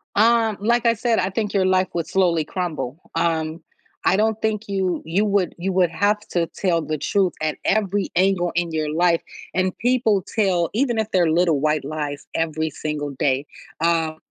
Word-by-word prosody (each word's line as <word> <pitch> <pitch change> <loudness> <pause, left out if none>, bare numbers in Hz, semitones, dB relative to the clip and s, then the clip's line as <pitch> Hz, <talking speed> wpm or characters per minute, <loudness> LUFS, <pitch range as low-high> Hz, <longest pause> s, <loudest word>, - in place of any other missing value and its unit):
Um, 225 0 +3
like 235 +3 +2
I 230 - +5
said, 230 +1 +1
I 185 +1 0
think 210 +1 -2
your 190 -2 +2
life 185 0 +3
would 170 -2 -2
slowly 170 -5 +2
crumble. 160 -7 -4 0.2
Um, 165 0 0 0.5
I 190 - +5
don't 220 0 +1
think 220 -1 -1
you 190 -2 -1
you 180 +6 +1
would, 200 -3 +1
you 190 +3 -2
would 180 -2 +3
have 205 +4 +1
to 170 -1 +1
tell 170 -4 +1
the 155 0 -3
truth 185 +4 +1
at 155 -1 -1
every 205 -1 +1
angle 180 -1 +2
in 170 -1 0
your 155 -1 -2
life, 170 0 +3 0.3
and 185 0 0
people 225 -5 +2
tell 185 -6 +2
even 240 -1 +1
if 220 0 -1
they're 175 -4 +3
little 165 -3 +3
white 150 -1 +1
lies 145 0 -4
every 160 -1 -1
single 150 -1 -4
day, 135 +1 0 0.4
um, 165 -2 +1
180 Hz, 185 wpm, -22 LUFS, 160-205 Hz, 0.5 s, I